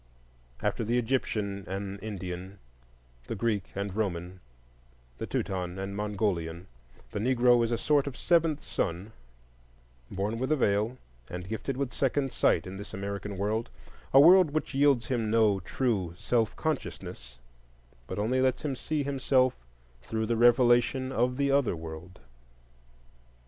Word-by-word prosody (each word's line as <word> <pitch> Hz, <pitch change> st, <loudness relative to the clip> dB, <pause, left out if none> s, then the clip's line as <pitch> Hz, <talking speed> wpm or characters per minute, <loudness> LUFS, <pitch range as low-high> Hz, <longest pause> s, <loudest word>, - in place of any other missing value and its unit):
After -, -, 0 dB
the 115 Hz, +3 st, +1 dB
Egyptian 110 Hz, -5 st, -1 dB
and 100 Hz, +1 st, -5 dB
Indian, 95 Hz, -2 st, -6 dB, 0.7 s
the -, -, -3 dB
Greek 105 Hz, -3 st, 0 dB
and 100 Hz, -1 st, -3 dB
Roman, 90 Hz, -3 st, -3 dB, 0.8 s
the -, -, -4 dB
Teuton 90 Hz, -2 st, -2 dB
and 95 Hz, +1 st, -4 dB
Mongolian, 95 Hz, -5 st, -2 dB, 0.5 s
the -, -, -3 dB
Negro 120 Hz, +1 st, +4 dB
is 115 Hz, -, -1 dB
a 115 Hz, -, +1 dB
sort 145 Hz, +1 st, +2 dB
of 135 Hz, -, -5 dB
seventh 165 Hz, -3 st, +2 dB
son, 90 Hz, +6 st, -3 dB, 1.0 s
born 105 Hz, +4 st, -2 dB
with 130 Hz, +3 st, -1 dB
a -, -, +5 dB
veil, 110 Hz, -1 st, +1 dB, 0.3 s
and 90 Hz, +1 st, -6 dB
gifted 110 Hz, +5 st, -3 dB
with 140 Hz, -2 st, -2 dB
second 135 Hz, 0 st, 0 dB
sight 85 Hz, -, +2 dB
in 95 Hz, +1 st, -7 dB
this 100 Hz, +2 st, -8 dB
American 100 Hz, 0 st, -4 dB
world,—a 110 Hz, +6 st, -1 dB
world 180 Hz, +3 st, +8 dB
which 155 Hz, +1 st, -2 dB
yields 135 Hz, -4 st, +3 dB
him 115 Hz, -4 st, 0 dB
no 110 Hz, -3 st, +3 dB
true 95 Hz, -9 st, -1 dB
self 115 Hz, 0 st, 0 dB
consciousness, 65 Hz, -, -4 dB, 0.7 s
but -, -, -5 dB
only 120 Hz, +5 st, +1 dB
lets 130 Hz, -1 st, +1 dB
him 140 Hz, -3 st, -1 dB
see 150 Hz, +3 st, -2 dB
himself 135 Hz, -2 st, +2 dB, 0.5 s
through 110 Hz, -, -2 dB
the 115 Hz, +1 st, 0 dB
revelation 120 Hz, +2 st, +4 dB
of 125 Hz, 0 st, +1 dB
the 140 Hz, -1 st, +2 dB
other 140 Hz, -9 st, +2 dB
world. 80 Hz, +2 st, -9 dB
110 Hz, 140 wpm, -29 LUFS, 95-130 Hz, 1.0 s, world